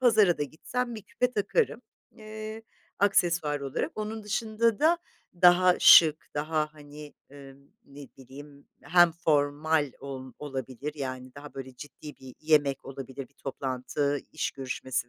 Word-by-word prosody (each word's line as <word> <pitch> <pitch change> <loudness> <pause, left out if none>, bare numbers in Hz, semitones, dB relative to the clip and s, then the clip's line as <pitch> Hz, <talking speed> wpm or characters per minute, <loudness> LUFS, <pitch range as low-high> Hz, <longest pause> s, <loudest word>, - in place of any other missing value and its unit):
pazara 215 -8 +4
da - - 0
gitsem 240 - -4
bir 215 - -8
küpe 250 +5 -1
takarım, 245 - 0 0.3
eee, 215 0 -8 0.4
aksesuar 170 -7 +2
olarak. 135 -1 -3
Onun 215 +1 -5
dışında 220 +1 0
da 330 +3 +4 0.4
daha 180 0 +6
şık, 155 -2 +7
daha 155 +1 -1
hani, 150 0 -12 0.2
eee, 140 -1 -12 0.3
ne 140 0 -12
bileyim, 140 +2 -13 0.2
hem 175 +2 +5
formal 150 -2 +1
ol 130 -2 -8
olabilir 135 0 -5
yani 130 -3 -6
daha 145 +1 -11
böyle 130 -1 -8
ciddi 145 +1 -11
bir 130 -1 -13
yemek 145 -3 +2
olabilir, 135 -1 -8
bir 140 - -35
toplantı, 135 +2 -2
iş 155 - -2
görüşmesi 130 -2 -4
150 Hz, 135 wpm, -28 LUFS, 135-185 Hz, 0.4 s, şık